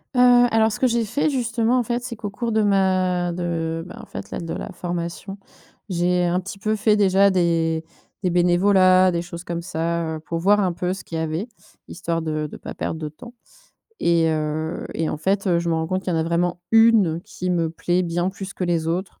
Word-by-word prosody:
Heu, - - +2 0.3
alors 225 0 +3
ce - - -5
que - - +2
j'ai 235 -1 +1
fait 285 +8 0
justement, 240 -2 +1
en - - +1
fait, 240 +1 -2
c'est 245 -1 -5
qu'au 210 -2 -5
cours 230 +4 -3
de 220 0 +2
ma 185 -3 +2
de 165 -2 -2
ben, - - -10
en 230 - -10
fait, - - -8
là, - - -4
de 165 -1 -5
la - - -5
formation, 175 +2 -5 0.5
j'ai 180 0 +1
un 175 +1 +1
petit 195 +2 -8
peu 215 +1 0
fait 215 0 +3
déjà 200 -1 +4
des 165 -3 +1 0.4
des 185 - +1
bénévolats, 185 +1 +4
des 170 -1 -1
choses 170 0 -8
comme 170 -1 -4
ça, 165 -1 -2
heu, - - -9
pour 165 +2 -5
voir 205 +4 +4
un 190 -3 +1
peu 180 +2 -2
ce 190 - -8
qu'il 165 - -6
y - - -1
avait, 160 +7 -2 0.4
histoire 170 -2 -3
de 155 -1 -2
de - - -10
pas - - -8
perdre 160 - -3
de 155 - -4
temps 235 +11 -13 0.7
et 170 -1 +3
heu 155 +1 -2
et 160 -1 -1
en - - -2
fait, 195 +6 0
heu, 175 -2 +3
je 170 0 -2
me 165 - +2
rends 160 0 -1
compte 185 +3 -2
qu'il 180 - -2
y - - 0
en - - +1
a - - +1
vraiment 175 +2 0
1 225 -7 +5
qui 200 -3 -6
me 170 -3 +1
plaît 175 +2 0
bien 175 +1 -1
plus 195 0 -7
que - - -6
les 170 -2 0
autres. 180 +3 -3
180 Hz, 235 wpm, -22 LUFS, 170-200 Hz, 0.7 s, 1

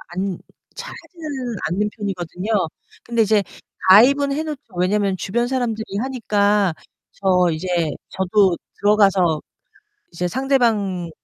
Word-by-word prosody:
않 185 +1 -3 0.4
잘 - - -7
하지는 280 - -6
않는 210 +5 -1
편이거든요. 190 -2 -5 0.6
근데 235 -1 -1
이제 210 -1 +3 0.5
가입은 275 +8 +6
해놓죠. 295 -7 -5
왜냐면 195 +2 +1
주변 235 +6 -1
사람들이 240 -4 -1
하니까 210 -6 +1 0.4
저 180 -2 +2
이제 160 +4 -4 0.4
저도 190 -1 +2 0.2
들어가서. 195 -6 +3 0.7
이제 180 +1 -2
상대방에 220 -7 0
205 Hz, 260 characters per minute, -21 LUFS, 185-240 Hz, 0.7 s, 가입은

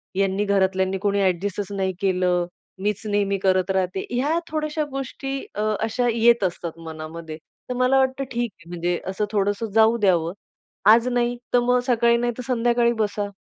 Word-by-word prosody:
यांनी 195 +1 +1
घरातल्यांनी 190 -1 +1
कोणी 200 +1 0
ॲडजस्टचं 195 +2 -1
नाही 190 -1 0
केलं. 180 -2 +1 0.4
मीचं 210 +1 -2
नेहमी 200 -1 +1
करत 185 -1 +2
राहते. 190 0 -1
ह्या 280 +7 +1
थोड्याशा 305 0 -1
गोष्टी 270 0 -4 0.2
अ, 210 - -2 0.2
अशा 235 +3 0
येत 235 -1 +4
असतात 170 -2 -3
मनामध्ये. 160 0 -7 0.3
तर - - -1
मला 255 +2 +3
वाटतं 265 +1 +1
ठीक 235 -1 -1
आहे. 170 -2 -17
म्हणजे 175 0 -1
असं 195 +2 -1
थोडंसं 205 +1 0
जाऊ 225 +1 +5
द्यावं. 175 -6 +2 0.6
आज 230 +2 +5
नाही 245 -1 0 0.2
तर 245 - +6
मग 250 +1 +2
सकाळी 235 -1 +3
नाही 240 0 0
तर - - -4
संध्याकाळी 240 -1 +2
बसा. 205 -1 -1
205 Hz, 165 wpm, -23 LUFS, 190-240 Hz, 0.6 s, तर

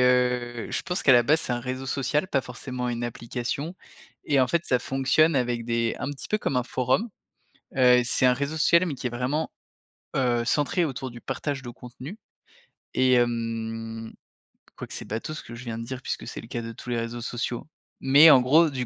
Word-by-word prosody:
heu, 125 -2 +2
je - - -2
pense 180 +1 -3
qu'à 135 - +7
la 120 -1 +7
base 155 +6 +3
c'est 125 - -2
un 120 - -1
réseau 130 +1 -4
social, 145 +6 0
pas 140 -7 +1
forcément 125 0 -5
une 120 0 -2
application 120 +7 -4 0.5
et 140 -2 +3
en 130 - +4
fait, 170 +3 0
ça 125 - +3
fonctionne 135 +5 +2
avec 120 -2 0
des 115 -1 0
un 140 - -3
petit 140 - -7
peu 215 - +1
comme 135 - -1
un 125 - +2
forum, 130 - 0 0.7
heu, 125 -1 +6
c'est 130 +1 +2
un 125 - +6
réseau 140 +4 -3
social 170 +3 +5
mais 150 - -2
qui 125 - -5
est - - -1
vraiment, 130 +6 -1 0.7
heu, 120 -3 +2
centré 150 +6 +1
autour 130 -2 -4
du 120 - -11
partage 140 -2 -3
de 120 - -8
contenu 130 - -10 0.8
et 130 0 +4
hem, 115 -1 -1 0.6
quoique - - -8
c'est - - -6
bateau 115 +8 -4
ce - - -6
que 120 - -10
je 120 - -9
viens 115 -2 -5
de 115 - -5
dire 130 +1 -6
puisque - - -4
c'est - - -6
le 115 - -12
cas 120 -1 -4
de 115 - -6
tous 125 - -10
les 120 - 0
réseaux 115 +1 -4
sociaux, 120 +1 -3 0.3
mais 145 +4 +8
en 135 - +9
gros, 155 +6 +5
du 130 -3 -3
125 Hz, 215 wpm, -26 LUFS, 120-140 Hz, 0.8 s, en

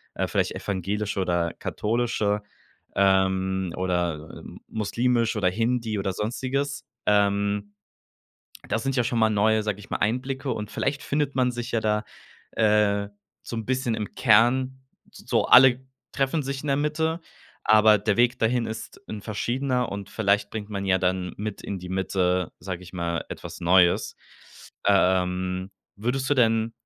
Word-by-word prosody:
äh, - - -1
vielleicht - - 0
evangelische 100 +1 -2
oder 85 -2 0
katholische, 105 -2 -1 0.5
ähm, 95 -1 +2
oder, 85 -4 -2
ähm, - - -12
muslimisch 115 +2 0
oder 95 -3 +2
Hindi 115 +1 -1
oder 95 -1 -2
sonstiges. 130 +7 -2 0.2
Ähm, 100 0 +2 1.0
das 110 - -1
sind 135 0 -1
ja 120 - +2
schon 115 0 0
mal 110 0 +4
neue, 110 +1 +3
sage 105 -2 -2
ich - - -14
mal, - - -1
Einblicke 130 +4 -1
und 105 0 -5
vielleicht 140 +1 -1
findet 145 -1 -1
man 125 -1 +2
sich 120 -1 -5
ja 115 - +1
da, 105 0 0 0.5
äh, 105 -1 +2 0.3
so - - -7
'n 115 - -3
bisschen 130 -3 0
im 105 -1 -5
Kern, 130 +3 +3 0.3
s - - -14
so, - - +2
alle 130 0 +7 0.3
treffen 140 +3 0
sich 135 0 -4
in - - -7
der 140 - +2
Mitte, 160 +3 0 0.4
aber 110 0 +6
der 105 0 0
Weg 120 +1 +3
dahin 115 +1 +1
ist 110 0 -7
'n 105 - -5
verschiedener 125 +3 -1
und 100 0 -6
vielleicht 105 -1 +1
bringt 105 -1 -5
man 100 -1 -3
ja 95 0 +3
dann 90 0 -1
mit 105 0 -5
in 100 - -4
die 90 0 -9
Mitte, 90 -1 0
sage 90 -2 -5
ich 90 - -12
mal, 85 -2 -2
etwas - - -8
Neues. 90 0 +3 0.7
Ähm, 95 -1 +1 0.3
würdest 125 +5 -1
du - - +5
denn 115 -2 +2
105 Hz, 160 wpm, -25 LUFS, 95-125 Hz, 1.0 s, alle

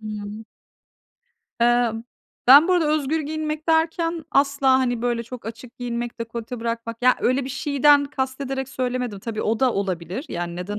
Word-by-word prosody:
Hımm. 210 0 -7 1.2
Eee, 240 -1 +3 0.5
ben 285 +7 +9
bu - - +4
arada 340 -4 +2
özgür 310 +1 0
giyinmek 310 +1 -4
derken, 325 0 +1
asla, 275 -1 +3
hani, 245 -3 -1
böyle 240 -1 0
çok 235 0 -10
açık 230 +2 -9
giyinmek, 240 -1 -4
dekolte 230 +1 -6
bırakmak, 230 0 -4
ya, 255 0 +5
öyle 255 +2 +1
bir 265 - -5
şeyden 285 +1 +3
kastederek 265 -1 -3
söylemedim. 250 -5 -3
Tabii 220 +1 -4
o 225 +3 0
da 255 -2 +3
olabilir, 190 - -3
yani, 175 0 -4
neden 200 +4 -4
250 Hz, 155 wpm, -23 LUFS, 230-280 Hz, 1.2 s, ben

